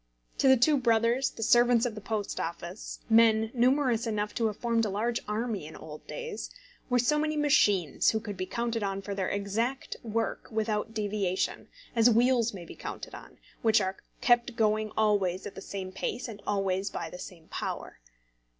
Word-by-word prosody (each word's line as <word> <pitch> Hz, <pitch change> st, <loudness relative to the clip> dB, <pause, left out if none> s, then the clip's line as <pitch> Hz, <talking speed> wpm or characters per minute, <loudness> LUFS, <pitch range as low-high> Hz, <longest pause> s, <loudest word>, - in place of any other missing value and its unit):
To -, -, +4 dB
the 265 Hz, 0 st, +7 dB
two 285 Hz, +5 st, +4 dB
brothers 235 Hz, +2 st, +2 dB
the 225 Hz, -, -6 dB
servants 240 Hz, +1 st, +5 dB
of 240 Hz, -, -1 dB
the 215 Hz, -, -8 dB
Post 210 Hz, -1 st, -3 dB
Office, 170 Hz, +3 st, -5 dB
men 225 Hz, -1 st, +5 dB
numerous 250 Hz, -2 st, +2 dB
enough 210 Hz, -1 st, -1 dB
to 230 Hz, -2 st, +1 dB
have 210 Hz, -, -4 dB
formed 230 Hz, -1 st, +1 dB
a 215 Hz, -, 0 dB
large 230 Hz, +4 st, -1 dB
army 210 Hz, -5 st, -2 dB
in 160 Hz, -, -11 dB
old 155 Hz, -1 st, -10 dB
days, 475 Hz, -3 st, -5 dB, 0.4 s
were 250 Hz, -, +3 dB
so 260 Hz, +5 st, +2 dB
many 305 Hz, 0 st, 0 dB
machines 205 Hz, -, +3 dB
who 220 Hz, -, +1 dB
could 210 Hz, -2 st, -6 dB
be 185 Hz, 0 st, -4 dB
counted 235 Hz, +2 st, -2 dB
on 195 Hz, -1 st, -2 dB
for 200 Hz, -, -4 dB
their 195 Hz, -2 st, -1 dB
exact 220 Hz, +6 st, -2 dB
work 225 Hz, 0 st, -2 dB
without 220 Hz, 0 st, -2 dB
deviation, 205 Hz, -3 st, -1 dB, 0.3 s
as 230 Hz, +1 st, +6 dB
wheels 240 Hz, 0 st, +3 dB
may 180 Hz, -4 st, -8 dB
be -, -, -10 dB
counted -, -, -7 dB
on, -, -, -11 dB, 0.2 s
which 220 Hz, -1 st, +4 dB
are 190 Hz, -1 st, -1 dB, 0.3 s
kept 240 Hz, 0 st, +3 dB
going 215 Hz, -1 st, +1 dB
always 200 Hz, -4 st, +2 dB
at 205 Hz, -, -6 dB
the -, -, -9 dB
same 190 Hz, -1 st, -6 dB
pace 240 Hz, +6 st, -3 dB
and 210 Hz, -3 st, -9 dB
always 195 Hz, -1 st, 0 dB
by -, -, -5 dB
the 180 Hz, -, -9 dB
same 170 Hz, -4 st, -10 dB
power. -, -, -5 dB
220 Hz, 185 wpm, -29 LUFS, 200-240 Hz, 0.4 s, the